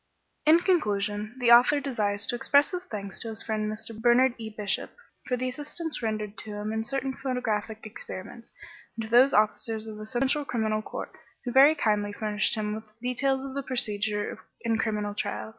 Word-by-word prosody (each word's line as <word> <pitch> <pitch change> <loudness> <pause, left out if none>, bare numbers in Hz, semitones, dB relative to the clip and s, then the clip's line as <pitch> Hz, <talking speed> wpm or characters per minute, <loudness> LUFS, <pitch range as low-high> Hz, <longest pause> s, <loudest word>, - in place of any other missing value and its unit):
In 315 +2 +8
conclusion, 210 - 0
the 245 -2 +3
author 245 +5 +7
desires 210 -7 +2
to - - -1
express 285 - +4
his 360 0 -4
thanks 200 - -6
to - - -5
his 220 -1 -5
friend 215 -1 -2
Mr. 225 +1 -5
Bernard 240 +3 +4
E. 220 -1 -5
Bishop 210 -2 -2 0.4
for 250 - 0
the 255 +1 -2
assistance 300 +4 -5
rendered 215 -2 -3
to 210 +1 -6
him 210 +1 -4
in 220 0 -1
certain 270 +2 -2
photographic 220 -5 -3
experiments, 215 +2 -8 0.4
and 225 - -4
to 220 - -11
those 255 +3 +6
officers 215 0 +1
of 215 -1 -8
the 215 0 -7
Central 265 +5 +1
Criminal 220 -5 -1
Court - - -7 0.3
who 245 - -2
very 275 +5 +7
kindly 210 -6 0
furnished 210 +1 0
him 210 -1 -2
with 215 0 -10
details 265 +2 0
of 270 - -6
the 280 - -2
procedure 210 -5 0 0.2
in 225 -1 0
criminal 210 -2 -1
trials. 205 +1 -3
225 Hz, 185 wpm, -27 LUFS, 210-255 Hz, 0.4 s, In